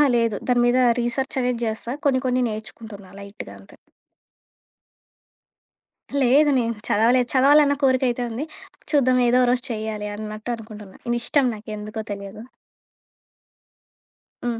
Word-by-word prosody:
ఆ! - - +7
లేదు. 230 -2 +1
దాని 245 -1 +3
మీద 245 +1 +3 0.2
రీసెర్చ్ 250 +3 -1
అనేది 250 -1 -1
జేస్తా. 225 +2 -3
కొన్ని 265 -3 +2
కొన్ని 250 0 +1
నేర్చుకుంటున్నా 215 -2 -9
లైట్‌గా 200 +1 -9
అంతే. - - -17 2.5
లేదు. 275 +4 +4
నేను 230 -1 -1 0.2
చదవలేదు. 240 +4 +3
చదవాలన్న 285 +2 +5
కోరికయితే 255 -2 +2
ఉంది. 265 +7 -4 0.5
చూద్దాం. 255 -4 +3
ఏదో 250 +1 +4
ఓ - - -1
రోజు 250 0 0
చేయాలన్నట్టు 215 0 -5
అనుకుంటున్నా. 215 -3 -12 0.2
ఇష్టం 250 +3 +1
నాకెందుకో 215 +1 -7
తెలియదు. 200 +1 -7 2.0
హ్మ్. 235 -1 -2
235 Hz, 115 wpm, -22 LUFS, 215-255 Hz, 2.5 s, ఆ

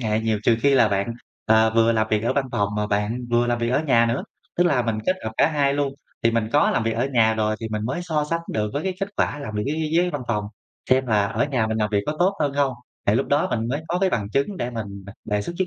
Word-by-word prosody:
hệ 110 -2 0
nhiều, 110 -1 0
trừ 115 0 +3
khi 140 -1 +4
là 120 -4 +5
bạn, 100 +3 -1 0.3
ờ, 110 0 +4
vừa 115 0 +4
làm 110 -1 +1
việc 105 0 +1
ở 120 - +2
văn 140 -1 0
phòng 100 0 +1
mà 105 0 0
bạn 105 +4 -1
vừa 120 0 +3
làm 120 0 0
việc 115 0 -1
ở 140 +4 +2
nhà 115 -3 +4
nữa. 115 +3 -1 0.3
Tức 175 - +3
là 140 -8 +3
mình 115 -2 -1
kết 185 - +2
hợp 110 - -3
cả - - +5
hai 140 -2 +1
luôn 140 -1 -1 0.3
thì 115 - +4
mình 115 -1 0
có 145 - +4
làm 115 - 0
việc 115 - +1
ở 120 +4 0
nhà 110 -2 +4
rồi 110 0 0
thì 110 - -4
mình 110 0 -3
mới 130 +8 -2
so 155 -4 -1
sánh 165 - 0
được 105 -1 -1
với 145 - -2
cái 190 -1 -2
kết 195 - -1
quả - - 0
làm 140 -7 -6
việc 105 0 -1
dưới 150 +2 -1
dưới 155 - -1
dưới 175 +2 +3
văn 145 -3 -4
phòng, 105 -3 0 0.5
xem 130 0 +3
là 105 -3 +2
ở 115 +5 0
nhà 130 -6 0
mình 110 0 -2
làm 105 -1 0
việc 100 - +3
có 150 - -2
tốt 190 +3 +3
hơn 145 -2 +1
hông, 140 -2 +2 0.3
thì 100 - +4
lúc 130 +4 +1
đó 145 +1 +2
mình 115 0 -1
mới 140 +4 -1
có 175 - 0
cái 190 -1 +2
bằng 105 -2 -2
chứng 140 +8 0
để 125 -6 -3
mình, 100 -4 -6
à, 100 - -9
đề 105 -1 -1
xuất 170 - -5
với 185 - +1
115 Hz, 305 wpm, -23 LUFS, 110-145 Hz, 0.5 s, là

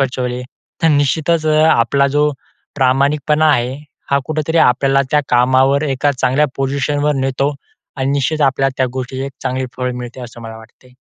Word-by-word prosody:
फसवले, 125 -2 -2 0.4
तर 165 - +4
निश्चितच 155 +3 +1
अ, 155 - +2 0.2
आपला 140 +4 +2
जो 150 0 +3 0.5
प्रामाणिकपणा 145 +3 +2
आहे, 125 0 0 0.4
हा 140 - +3
कुठेतरी 155 +1 -1
आपल्याला 135 +1 +3
त्या 150 - +4
कामावर 130 +3 +3
एका 140 +1 0
चांगल्या 130 +3 +1
पोझिशनवर 140 +2 0
नेतो. 135 +2 -1 0.4
आणि 135 +1 0
निश्चित 145 +2 -1
आपल्याला 135 0 +2
त्या 130 - +2
गोष्टीची 130 0 -5
एक 140 - -8
चांगली 130 0 -2
फळ 125 -1 -2
मिळते 125 +1 -8
असं 120 -1 -10
मला 110 0 -8
वाटते. 115 +3 -19
135 Hz, 155 wpm, -16 LUFS, 130-145 Hz, 0.5 s, तर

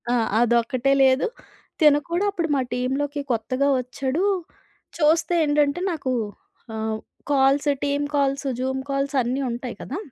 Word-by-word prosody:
ఆ! - - +2 0.3
అదొక్కటే 240 +3 +2
లేదు. 265 - +4 0.5
తిను 300 -3 +6
కూడా 350 +4 0
అప్పుడు 340 -4 -2
మా 270 - +2
టీమ్‌లోకి 275 +4 -1
కొత్తగా 255 +4 0
వచ్చాడు. 260 +6 -2 0.7
చూస్తే 330 +2 +3
ఏంటంటే 290 +1 +2
నాకు 285 -6 -3 0.6
ఆహ్, 220 0 -2 0.3
calls, 275 +1 +3
team 285 0 0
calls, 275 0 +1
Zoom 265 +1 -1
calls, 275 +1 -1
అన్నీ 255 +4 -1
ఉంటాయి 240 0 -5
కదా! 285 - -5
275 Hz, 130 wpm, -23 LUFS, 255-290 Hz, 0.7 s, తిను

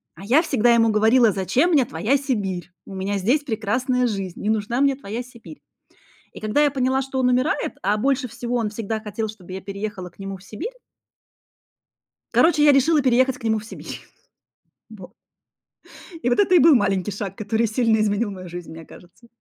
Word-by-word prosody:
А - - -12
я 260 +9 +4
всегда 240 -7 +2
ему 230 -1 +4
говорила: 220 +2 +4
"Зачем 240 - +1
мне 285 -6 +4
твоя 245 +1 0
Сибирь? 200 -10 -3
У 195 - -9
меня 195 +2 -2
здесь 245 +10 +1
прекрасная 250 +2 0
жизнь, 195 -5 -4
не 210 - -1
нужна 220 +4 0
мне 280 -1 +3
твоя 235 -2 -6
Сибирь". 250 +4 -14 0.7
И - - -10
когда 215 +7 +1
я 290 - +3
поняла, 260 0 0
что 270 0 -4
он 250 -1 +2
умирает, 255 +4 0
а 205 +3 +1
больше 265 +3 0
всего 245 +1 -4
он 225 -3 -1
всегда 220 +1 -4
хотел, 215 +1 -4
чтобы 190 -4 -11
я 190 - -6
переехала 200 -2 -6
к 175 - -32
нему 195 0 -6
в 185 - -19
Сибирь 330 - -7 1.6
короче, 320 -3 +4
я 295 - +7
решила 290 +3 +3
переехать 260 0 +2
к - - -17
нему 220 -1 +1
в 215 - -12
Сибирь. - - -9 0.9
Во - - -12 1.1
И 245 - +2
вот 245 - +1
это 375 -3 +4
и - - +7
был 315 +1 +7
маленький 200 -3 0
шаг, 195 -1 -5
который 220 +2 -1
сильно 225 0 +2
изменил 210 +1 0
мою 185 -2 -9
жизнь, 175 -1 -8
мне 160 0 -10
кажется. 180 +9 -17
225 Hz, 190 wpm, -22 LUFS, 200-260 Hz, 1.6 s, я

